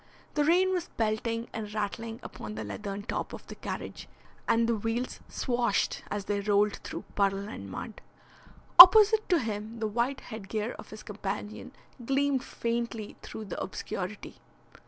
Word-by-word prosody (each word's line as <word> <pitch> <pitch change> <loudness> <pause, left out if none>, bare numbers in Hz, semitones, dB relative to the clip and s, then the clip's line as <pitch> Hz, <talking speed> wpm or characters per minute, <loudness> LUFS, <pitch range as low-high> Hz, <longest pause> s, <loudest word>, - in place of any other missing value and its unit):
The 295 - +2
rain 365 +5 +3
was 360 -2 -2
pelting 230 +1 -1
and 215 -2 -5
rattling 225 +2 -3
upon 105 0 -8
the 110 - -4
leathern 195 - -5
top - - -4
of - - -9
the - - -9
carriage - - -6 0.4
and 230 0 +3
the 235 - +2
wheels 225 +4 -3
swashed 240 -5 0
as 205 -1 -3
they 205 0 -1
rolled 205 0 +2
through - - -7
puddle 200 0 0
and 100 - -8
mud. 220 - -7 0.8
Opposite 430 +4 +10
to 355 - +5
him 220 -3 -4
the 225 - -2
white 240 +5 -1
headgear 220 +1 -4
of - - -10
his 215 - -10
companion 210 +2 -5 0.3
gleamed 275 +1 +1
faintly 235 -3 -3
through 220 - -8
the 195 - -5
obscurity. 190 +1 -5
220 Hz, 155 wpm, -29 LUFS, 205-245 Hz, 0.8 s, Opposite